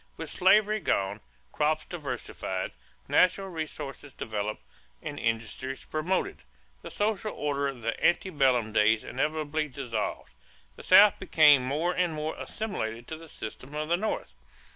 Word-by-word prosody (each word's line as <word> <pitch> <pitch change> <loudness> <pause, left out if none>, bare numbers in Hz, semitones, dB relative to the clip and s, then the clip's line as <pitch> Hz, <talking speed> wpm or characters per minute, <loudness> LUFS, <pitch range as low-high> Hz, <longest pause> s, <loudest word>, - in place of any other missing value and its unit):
With 160 -2 -6
slavery 210 +3 +4
gone, 95 - 0 0.3
crops 155 +1 +1
diversified, 140 -8 -4 0.4
natural 185 +2 +3
resources 150 -4 -6
developed, 105 -1 -4 0.4
and 145 - -5
industries 115 +4 -3
promoted, 165 +5 -1 0.4
the - - -8
social 215 0 -1
order 140 -1 -1
of 130 -4 -6
the 115 +1 -2
ante 180 +2 +3
bellum 125 -7 +2
days 110 +1 +4
inevitably 155 0 -1
dissolved; 125 - -4 0.4
the - - -11
South 200 +2 +7
became 155 -7 +6
more 155 +7 0
and 180 -2 +1
more 155 +1 -3
assimilated 120 - -4
to 160 - -4
the 165 0 -13
system 130 +5 -8
of 155 +1 -3
the 170 - +4
North. 185 - -3
150 Hz, 140 wpm, -28 LUFS, 125-175 Hz, 0.4 s, South